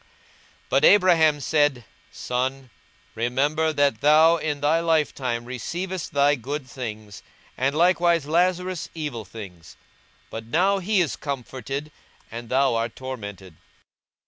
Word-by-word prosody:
42:016:025 - - -32 0.6
But 135 +3 +4
Abraham 165 -6 +5
said, 145 -5 +1 0.3
Son, 130 +1 -3 0.4
remember 145 +7 0
that 145 -6 +1
thou 160 +3 +6
in 150 -2 -3
thy 150 +3 +2
lifetime 145 -7 0
receivedst 175 +9 -5
thy 145 +1 +3
good 140 +1 -5
things, 110 -5 -7 0.3
and 135 +3 0
likewise 170 -2 +3
Lazarus 180 +2 0
evil 145 -9 -5
things: 90 -5 -11 0.6
but 115 0 -7
now 190 +9 +2
he 195 +1 +1
is 160 - -1
comforted, 135 +1 -5 0.4
and 115 0 -8
thou 135 0 +2
art 115 0 -2
tormented. 100 -9 -8
140 Hz, 120 wpm, -24 LUFS, 120-160 Hz, 0.6 s, thou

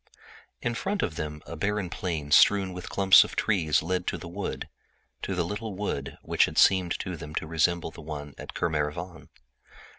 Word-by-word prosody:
In 120 - 0
front 195 - -2
of 80 - -1
them 75 0 -5
a - - -7
barren 100 +3 -1
plain 80 -5 -3
studded 95 +4 +5
with 90 0 -7
clumps 95 -1 +7
of - - -8
trees 80 -9 +2
led 90 +1 -2
to - - -1
the 85 - -9
wood, 95 +4 -5 0.5
to 95 - -3
the 85 -2 0
little 105 +2 -5
wood 95 -8 -4
which - - +3
had - - -7
seemed 90 -3 +4
to 90 -2 -4
them 75 -1 -9
to - - -1
resemble 80 +1 +1
the 85 - -11
one 75 -2 -7
at - - -8
Kermarivan. 80 +2 -2
85 Hz, 185 wpm, -27 LUFS, 75-95 Hz, 0.5 s, clumps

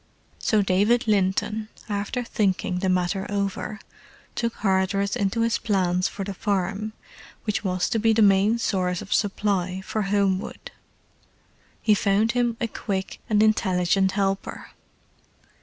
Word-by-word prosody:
So 215 -2 +2
David 205 +6 +2
Linton, 210 +1 +1 0.2
after 210 +4 -2
thinking 190 -5 0
the 190 0 0
matter 185 +1 0
over, 200 +1 -2 0.5
took 235 -1 -2
Hardress 195 +1 +1
into 215 0 0
his 230 -1 +1
plans 185 -3 +1
for 200 - -5
the 200 +1 -4
farm 200 +2 -2 0.5
which 210 -1 -1
was 185 -2 0
to 225 - 0
be 225 +1 +3
the 220 0 +4
main 200 +3 +4
source 185 -6 -1
of 195 - -3
supply 195 -3 0
for 215 +3 -3
Homewood. 200 0 -1 1.1
He 215 - +5
found 205 +2 +2
him 240 -2 0
a 235 - 0
quick 190 -3 -4
and 210 -1 +4
intelligent 190 -3 +2
helper. 195 -1 -2
200 Hz, 135 wpm, -24 LUFS, 190-215 Hz, 1.1 s, He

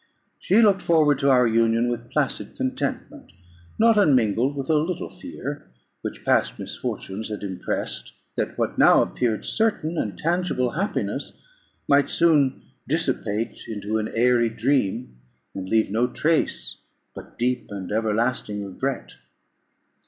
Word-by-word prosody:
She 220 +5 +4
looked 195 -3 +4
forward 150 -4 +3
to 140 -1 +2
our 125 -2 +5
union 115 +1 +2
with 120 -1 -4
placid - - -1
contentment, - - -4 0.5
not 225 -1 +5
unmingled 130 - +3
with 135 -1 -4
a 160 - +2
little 155 +3 -1
fear, - - -7 0.3
which - - -7
past - - +2
misfortunes 105 +4 -5
had 105 -1 -5
impressed, 95 -3 -3 0.2
that - - -3
what - - -2
now - - +6
appeared 110 -4 -2
certain 175 -7 0
and 100 -5 -3
tangible 170 - 0
happiness, 195 - -3 0.4
might 140 0 +4
soon 150 -6 +3 0.2
dissipate 115 -8 -2
into 110 0 -2
an 110 - -3
airy 120 0 +3
dream, 115 - -1 0.4
and 95 -1 -6
leave 110 -2 +2
no 115 +4 +2
trace 155 +5 0 0.3
but - - -12
deep 125 0 -1
and 100 -2 -6
everlasting 110 -1 0
regret. 130 +8 -4
125 Hz, 130 wpm, -24 LUFS, 110-150 Hz, 0.5 s, now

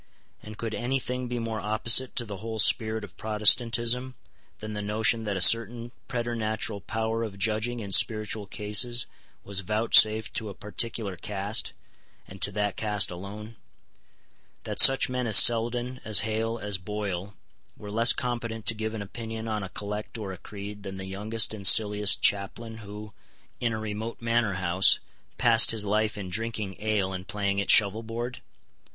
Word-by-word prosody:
And 105 0 -11
could 115 -1 -5
any 125 +4 -2
thing 125 -1 -4
be 120 0 -4
more 115 -2 -4
opposite 115 +5 +2
to 120 - -3
the 105 -3 -8
whole 110 +2 -7
spirit 110 0 +3
of - - -11
Protestantism 120 +3 +2 0.4
than 110 0 -8
the 105 - -5
notion 110 +2 0
that 100 -2 -3
a - - -3
certain 115 +3 +3 0.2
preternatural 115 -4 -4
power 110 +2 -3
of 105 -4 -6
judging 110 +4 -2
in 100 -2 -8
spiritual 105 +1 +3
cases 110 +4 +2 0.4
was 100 -1 -1
vouchsafed 110 +1 +3
to 110 - -3
a 100 - -9
particular 105 0 -3
caste, 105 +3 -2 0.5
and 100 0 -13
to 105 - +3
that 105 -1 -3
caste 105 -2 +2
alone; 105 +5 -10 1.1
that - - -6
such 135 0 +7
men 125 -1 -3
as 110 - +9
Selden, 120 +2 +3
as 105 -2 +4
Hale, 110 +1 -3
as 105 -3 -4
Boyle, 100 0 -6 0.4
were 105 -1 -10
less 115 +3 +4
competent 115 -3 -4
to - - +5
give 110 0 -5
an 105 - -5
opinion 110 +2 -8
on 110 -1 -3
a 95 - -7
collect 105 +3 -7
or 105 -4 -6
a 95 - -8
creed 105 +1 -10
than 95 -1 -8
the 95 - -7
youngest 105 +4 +1
and 100 -3 +3
silliest 105 +1 +4
chaplain 110 +3 0
who, 105 -1 -10 0.5
in 120 - -1
a 110 - -3
remote 110 +2 -6
manor 115 -3 0
house, 95 0 +3 0.4
passed 115 -1 +5
his 110 -2 +1
life 105 +1 -1
in 95 -3 -7
drinking 105 -1 -4
ale 105 -3 -1
and 95 0 -7
playing 100 -1 -2
at - - -5
shovelboard? 115 +4 +1
110 Hz, 170 wpm, -26 LUFS, 100-115 Hz, 1.1 s, as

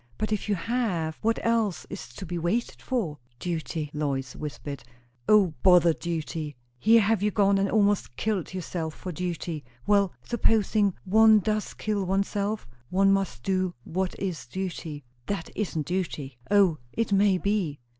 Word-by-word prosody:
But 215 0 -2
if 210 0 -2
you 205 - +3
have, 180 -6 -1
what 225 +1 +2
else 225 -5 +1
is - - -7
to 190 - -6
be 175 0 -3
waited 185 +9 -1
for?" 190 - -2 0.2
"Duty 160 -1 -3
" - - -35
Lois 135 -3 -2
whispered. 145 -2 -6 0.5
"O, 200 -6 +5
bother 175 -3 +6
duty! 160 -3 -4 0.2
Here 225 - +6
have 215 -1 +2
you 210 - +3
gone 200 -2 +3
and 195 0 +1
almost 205 - +2
killed 210 - -1
yourself 170 -3 -4
for 185 - -6
duty." 170 -2 -4 0.2
"Well, 200 -2 +3
supposing 215 -4 +2
one 220 +3 +7
does 215 +1 -1
kill 210 -2 -1
oneself? 200 - -1 0.2
one 195 +1 +4
must 190 -11 -1
do 185 -2 0
what 185 +5 -2
is 180 -10 -4
duty." 165 -2 -5 0.2
"That 195 -5 -3
isn't 165 -8 -2
duty." 150 -7 -3
"O, 195 -6 +4
it 230 -2 -1
may 195 -1 +4
be." 185 -7 -1
190 Hz, 155 wpm, -27 LUFS, 165-210 Hz, 0.5 s, one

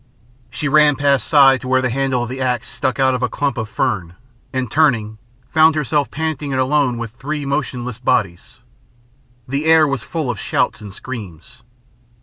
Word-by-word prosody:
She 150 - -3
ran 150 0 +4
past 140 -1 +1
Si 135 -4 +5
to 130 - -8
where 130 0 +3
the 130 -2 -1
handle 130 -1 0
of 120 - -5
the 130 +1 -5
axe 125 -3 -1
stuck 130 +1 -2
out 130 -1 +3
of 125 - -2
a 125 - 0
clump 140 -3 -2
of 110 -3 -4
fern, 100 -10 -2 0.4
and 130 -4 -3
turning, 115 -9 +1 0.3
found 160 0 +5
herself 150 -1 0
panting 155 -2 -3
and 130 - -1
alone 130 -2 +1
with 115 -2 -5
three 145 +5 -5
motionless 125 -4 -3
bodies. 120 -1 -1 0.9
The 140 +4 -2
air 160 -1 +5
was 135 -2 -2
full 155 -7 -3
of 105 - -7
shouts - - -1
and 105 -2 -9
screams. 115 - -9
130 Hz, 180 wpm, -18 LUFS, 120-145 Hz, 0.9 s, Si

